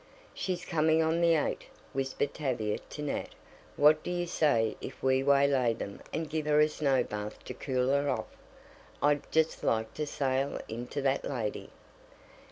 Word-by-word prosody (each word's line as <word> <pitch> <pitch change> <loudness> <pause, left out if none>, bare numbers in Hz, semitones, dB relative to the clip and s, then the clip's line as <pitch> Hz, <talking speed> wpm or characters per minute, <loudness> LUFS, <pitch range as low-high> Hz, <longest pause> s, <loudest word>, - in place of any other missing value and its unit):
"She's 185 -2 -3
coming 160 0 +3
on 160 +1 +1
the 170 -1 +5
eight," 150 - -1 0.3
whispered 135 +1 -1
Tavia 120 -8 -1
to 150 - -8
Nat. 145 - -3 0.4
"What 150 +1 +5
do - - -5
you 175 0 -1
say 140 -10 +2
if - - -8
we 130 0 +3
waylay 140 -4 +3
them 100 -3 -7
and 160 +1 -2
give 155 0 -3
her 150 0 +4
a 150 - +6
snow 140 -3 +1
bath 105 0 -6
to - - -5
cool 130 -2 -1
her 140 +1 +2
off? - - -1 0.8
I'd 145 0 +2
just 160 0 +1
like 110 0 0
to 150 -1 -3
sail 135 -1 -1
into 120 +4 -4
that 135 0 +1
lady." 115 -7 -3
140 Hz, 170 wpm, -30 LUFS, 130-155 Hz, 0.8 s, a